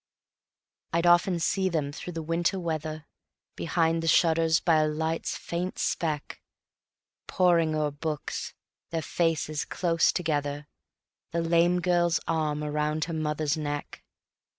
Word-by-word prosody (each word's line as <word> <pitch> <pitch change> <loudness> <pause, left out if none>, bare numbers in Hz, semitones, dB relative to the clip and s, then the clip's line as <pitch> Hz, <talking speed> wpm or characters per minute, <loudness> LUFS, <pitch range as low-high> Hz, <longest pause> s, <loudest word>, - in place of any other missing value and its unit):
I'd 170 +1 +2
often 175 +1 +4
see 190 +3 +1
them 150 -5 -1
through 175 +4 -7
the 165 -1 -4
winter 170 +4 0
weather, 155 -2 -4 0.5
Behind 165 0 +1
the 165 - -3
shutters 165 0 +4
by 165 -2 +3
a 155 0 +3
light's 160 +2 -2
faint 175 +2 -4
speck, 155 -4 -2 0.9
Poring 170 -3 +3
o'er 150 -1 0
books, 150 +1 -4 0.3
their 165 -1 -2
faces 155 -1 0
close 165 -2 +1
together, 145 -4 -2 0.7
The 170 - +1
lame 170 +2 +3
girl's 175 -1 +2
arm 150 -2 0
around 150 +1 -1
her 165 - -5
mother's 150 -1 -1
neck. 145 -2 -5
160 Hz, 130 wpm, -27 LUFS, 150-170 Hz, 0.9 s, often